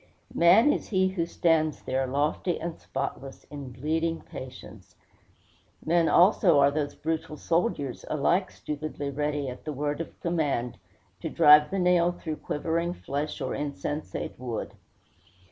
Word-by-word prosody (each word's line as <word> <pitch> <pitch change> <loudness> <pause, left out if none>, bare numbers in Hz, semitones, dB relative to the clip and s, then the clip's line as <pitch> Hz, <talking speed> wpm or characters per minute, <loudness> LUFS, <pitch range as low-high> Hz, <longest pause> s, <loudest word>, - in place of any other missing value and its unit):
Man 200 +12 +6
is - - -4
he 190 -2 +2
who 175 -3 -2
stands 160 -3 +1
there, 130 0 -1
lofty 150 +6 0
and 165 0 -4
spotless, 135 0 -5
in 140 -3 -7
bleeding 160 +6 -1
patience! 125 -7 -11 0.9
Men 170 0 +3
also 180 -2 +5
are 140 0 +5
those 145 -1 -2
brutal 160 -1 -3
soldiers, 165 - -1
alike 170 +6 +1
stupidly 150 -1 -5
ready, 145 0 -2
at 125 0 -7
the 155 - -4
word 145 +3 -2
of 165 - -9
command, 145 -8 -1 0.4
to - - -4
drive 150 0 +7
the 195 - -2
nail 180 -1 +3
through 160 -3 -5
quivering 170 +3 -2
flesh 145 0 -4
or - - -2
insensate 145 0 -4
wood. 120 -3 -4
150 Hz, 140 wpm, -27 LUFS, 140-170 Hz, 0.9 s, drive